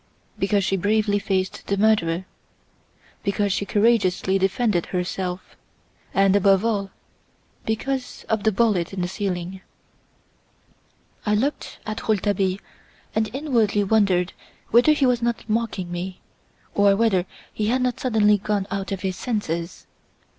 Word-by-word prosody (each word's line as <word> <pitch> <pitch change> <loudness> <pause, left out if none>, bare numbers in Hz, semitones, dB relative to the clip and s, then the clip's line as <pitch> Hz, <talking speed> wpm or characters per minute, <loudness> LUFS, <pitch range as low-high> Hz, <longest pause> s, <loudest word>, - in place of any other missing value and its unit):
"Because 200 0 +2
she 195 - +1
bravely 205 +1 +1
faced 190 -2 -2
the 200 - 0
murderer; 190 -5 +2 1.0
because 200 0 0
she 200 - -2
courageously 195 -3 +2
defended 195 -1 +1
herself 180 0 -3 0.6
and, 195 0 +3
above 195 +1 +4
all, 200 -4 0 0.8
because 255 +4 -3
of 220 -1 0
the 220 - +2
bullet 200 -5 +1
in 190 - -3
the 175 - 0
ceiling." 185 -1 -4 1.6
I 210 -1 +2
looked 270 +8 -2
at 215 +1 -4
Rouletabille 200 -3 +1 0.6
and 220 -1 0
inwardly 235 -7 +1
wondered 190 -4 +2 0.4
whether 245 +7 +6
he 290 -2 +2
was 245 -2 +2
not 235 -1 -2
mocking 215 -5 -2
me, 180 +1 -5 0.5
or 200 -1 +4
whether 195 -4 +2 0.3
he 210 - -1
had 250 +3 +1
not 250 -1 -1
suddenly 210 -4 +3
gone 205 0 -1
out 195 0 -3
of 195 -2 -3
his 190 -2 -2
senses. 175 -7 -3
205 Hz, 130 wpm, -23 LUFS, 190-220 Hz, 1.6 s, whether